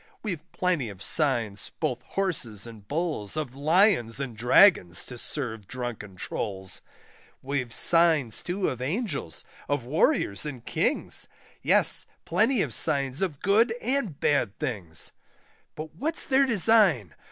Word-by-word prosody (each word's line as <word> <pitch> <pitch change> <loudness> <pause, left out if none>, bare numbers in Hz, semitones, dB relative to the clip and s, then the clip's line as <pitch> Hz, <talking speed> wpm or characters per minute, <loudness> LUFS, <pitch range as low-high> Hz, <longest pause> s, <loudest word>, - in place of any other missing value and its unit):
We've 185 -8 -3
plenty 175 -10 0
of 100 -1 -10
signs, 120 -8 0
both 125 -1 -1
Horses 120 - -2
and 110 -4 -11
Bulls, 155 - -2
Of 150 -5 -3
Lions 155 - +3
and 130 -5 -4
Dragons, 120 - +4
to 125 - -9
serve 115 -5 -4
drunken 120 -6 -6
Trulls; 95 0 -3 0.6
We've 130 -3 -2
signs 160 -5 +3
too 185 +2 -2
of 125 -1 -6
Angels, 145 - -3 0.2
of 145 -4 -1
Warriors 145 - +2
and 130 -6 -5
Kings 215 - 0 0.3
Yes, - - +4 0.2
plenty 255 -7 +2
of - - -5
signs 140 -2 -1
of 165 -8 -2
good 225 +4 +3
and 245 - -1
bad 120 -8 +1
things. 100 - -4 0.6
But 155 0 -7
what's 310 - -2
their 270 -1 +3
design? 200 - +3
140 Hz, 130 wpm, -27 LUFS, 115-180 Hz, 0.6 s, Dragons